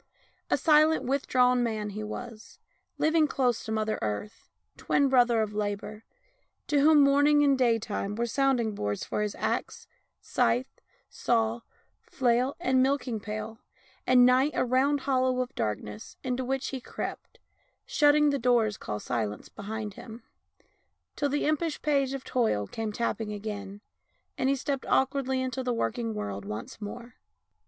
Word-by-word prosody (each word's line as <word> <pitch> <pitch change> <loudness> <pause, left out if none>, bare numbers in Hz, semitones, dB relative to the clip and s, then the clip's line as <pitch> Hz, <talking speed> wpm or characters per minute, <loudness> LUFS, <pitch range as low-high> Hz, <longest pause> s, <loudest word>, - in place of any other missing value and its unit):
A - - +3
silent, 310 0 +4
withdrawn 250 -2 +2
man 215 -3 -2
he 215 +2 -5
was, 225 +1 -8 0.4
living 315 0 +3
close 250 -5 0
to 220 - -6
Mother 215 0 -1
Earth, 110 - -5 0.3
twin 280 -1 +1
brother 240 -3 +4
of 210 -1 -5
Labour, 210 +1 -4 0.6
to 290 - +1
whom 300 +1 +6
Morning 290 +1 +4
and 280 -1 +4
Daytime 225 -5 0
were 235 +2 -1
sound 270 +2 +1
ing 220 -2 -1
boards 105 - -3
for - - -2
his 210 -1 -2
axe, 220 +2 -3 0.3
scythe, 250 +2 0 0.3
saw, 230 0 0 0.4
flail, 250 +1 0
and 260 -6 +2
milking 260 -4 0
pail, 215 +2 -6 0.5
and 250 -1 +6
Night 255 +3 +4
a - - +1
round 265 +3 +2
hollow 255 -2 +1
of 255 +1 -2
darkness 105 0 -4
into 255 0 -2
which 265 +1 -2
he 265 -2 -5
crept, - - -7 0.5
shutting 300 -10 +4
the 280 - -1
doors 230 -4 +2
called 105 0 -5
Silence 110 -4 -3
behind 210 0 -6
him, 225 +3 -11 0.9
till 285 - 0
the 290 +2 0
impish 310 +1 0
page 275 -3 +1
of 270 -1 -5
Toil 220 - 0
came 220 - -4
tapping 220 -1 -2
again, 205 -1 -6 0.5
and 260 - 0
he 275 - +3
stepped 275 0 -3
awkwardly 265 -1 +1
into 260 0 -3
the 250 -2 -1
working 230 -1 -2
world 100 - -4
once 105 - -7
more. 235 +4 -8
245 Hz, 150 wpm, -28 LUFS, 215-270 Hz, 0.9 s, whom